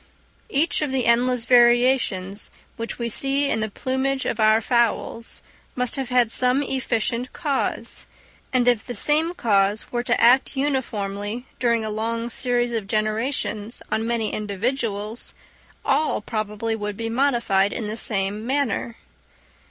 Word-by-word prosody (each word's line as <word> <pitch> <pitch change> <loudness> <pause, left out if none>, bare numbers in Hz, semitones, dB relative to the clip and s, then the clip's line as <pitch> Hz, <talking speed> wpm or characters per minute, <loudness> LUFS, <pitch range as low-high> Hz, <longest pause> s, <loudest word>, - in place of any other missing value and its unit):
Each 300 +4 +1
of 295 -3 -1
the 265 -2 0
endless 240 0 +2
variations 240 -5 +3 0.3
which 230 0 -5
we 235 - -2
see 275 +4 0
in - - 0
the 215 0 -1
plumage 265 +4 -2
of 230 - -2
our 215 0 +5
fowls 235 -1 -1 0.3
must 250 -1 +2
have 265 -3 -3
had 245 -3 +3
some 255 +3 +3
efficient 250 -2 -1
cause; 290 -6 -2 0.4
and 250 -1 +2
if 240 -3 +3
the 245 - -6
same 310 - +2
cause 205 - +1
were 240 - 0
to 245 - 0
act 255 +4 +4
uniformly 225 -5 -2
during 235 -2 +1
a 215 - -2
long 230 +2 -2
series 245 0 0
of 220 -4 -2
generations 215 +1 -1
on 225 +1 0
many 230 -2 -1
individuals, 215 +1 -3 0.5
all 310 - +2
probably 215 0 -3
would 210 -2 -4
be 225 0 -3
modified 230 -6 +2
in 225 - -4
the 210 +1 -3
same 210 -1 -1
manner. 255 -3 -1
235 Hz, 145 wpm, -23 LUFS, 215-255 Hz, 0.5 s, our